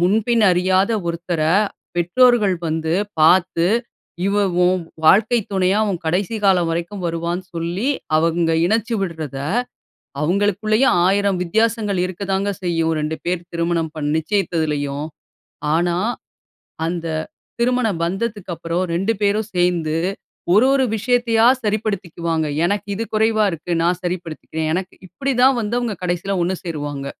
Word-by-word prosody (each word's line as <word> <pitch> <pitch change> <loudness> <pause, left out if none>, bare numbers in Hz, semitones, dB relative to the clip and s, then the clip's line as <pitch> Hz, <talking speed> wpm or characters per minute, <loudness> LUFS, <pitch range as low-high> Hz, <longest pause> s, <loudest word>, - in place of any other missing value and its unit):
முன்பின் 220 +5 +2
அறியாத 185 +3 +2 0.2
ஒருத்தர, 170 -1 -2 0.5
பெற்றோர்கள் 205 +2 +3
வந்து 160 +1 -1 0.3
பாத்து, 170 +1 +4 0.6
இவ 200 - +1 0.3
உன் 185 0 +2 0.2
வாழ்க்கை 220 +8 +5
துணையா, 190 +2 +2
உன் 175 - -3
கடைசி 190 +6 0
காலம் 180 -4 +4
வரைக்கும் 175 +3 -4
வருவான்னு 170 +2 -2
சொல்லி, 170 +8 -2 0.3
அவுங்க 165 +1 +2
இணைச்சு 225 +3 0
விடுறதை, 155 -7 -4 0.8
அவுங்களுக்குள்ளேயே 205 - +2 0.2
1000 200 -1 +2
வித்தியாசங்கள் 215 +1 0
இருக்கதாங்க 195 +2 -2
செய்யும், 165 -2 0
2 155 +1 -2
பேர் 175 -1 -2
திருமணம் 170 -1 -1
பண் 145 -1 -2
நிச்சயித்ததிலேயும். 155 -6 -1 0.7
ஆனா, 175 +1 +1 0.9
அந்த 170 -1 -3 0.6
திருமண 250 -1 +2 0.2
பந்தத்துக்கப்புறம், 180 -3 -2
2 195 +6 +1
பேரும் 210 +1 +1
சேந்து, 170 -3 +1 0.6
ஒரு 220 +6 +6
ஒரு 265 -1 +3
விஷயத்தையா 230 0 +2 0.2
சரிப்படுத்திக்குவாங்க. 175 -7 -1 0.2
எனக்கு 205 +2 -1
இது 225 - -2
குறைவா 220 0 +3
இருக்கு. 165 +2 -6
நான் 175 +1 +1
சரிப்படுத்திக்கிறேன். 165 -3 -4
எனக்கு 185 +1 -3
இப்டி 270 +9 -2
தான் 265 0 +6
வந்து 215 +2 -2
அவுங்க 235 -3 -2
கடைசில 180 +2 -1
ஒண்ணு 185 +2 0
சேருவாங்க. 145 -5 -4
180 Hz, 120 wpm, -20 LUFS, 165-210 Hz, 0.9 s, ஒரு